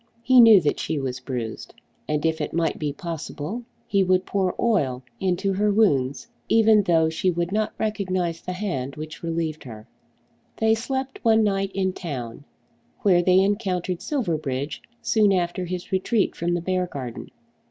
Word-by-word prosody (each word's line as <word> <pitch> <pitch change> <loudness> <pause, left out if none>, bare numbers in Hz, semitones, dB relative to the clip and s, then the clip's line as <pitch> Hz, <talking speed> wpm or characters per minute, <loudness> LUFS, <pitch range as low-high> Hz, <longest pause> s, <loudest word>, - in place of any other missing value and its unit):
He 255 0 +7
knew 225 -4 +9
that 150 -2 0
she 155 - -2
was 130 -2 -3
bruised, 120 -3 -5 0.3
and 150 +1 -1
if 160 -1 0
it 150 - -3
might 165 -1 0
be 150 -2 -1
possible 165 - -6 0.2
he 200 -1 +2
would 185 0 +2
pour 190 -2 0
oil 140 - +1 0.2
into 190 +1 0
her 205 +2 +2
wounds, 140 -11 +2 0.2
even 220 -1 +5
though 165 -4 +3
she 160 +3 0
would 175 0 -1
not 215 +1 -1
recognise 185 -6 -2
the 180 - -5
hand 140 -9 -3
which 155 0 -8
relieved 165 -2 -3
her. 110 -3 -10 0.7
They 220 0 +3
slept 265 +4 -3
one 225 -2 +4
night 195 -1 0
in 190 -1 0
town, 135 -7 -6 0.6
where 180 -4 +4
they 185 +1 +4
encountered 190 -3 -1
Silverbridge 155 - -2 0.2
soon 220 -3 +3
after 180 -1 0
his 180 0 -5
retreat 195 +3 +1
from 175 +1 -1
the 175 - -2
Beargarden. 170 -9 -3
180 Hz, 160 wpm, -24 LUFS, 155-205 Hz, 0.7 s, knew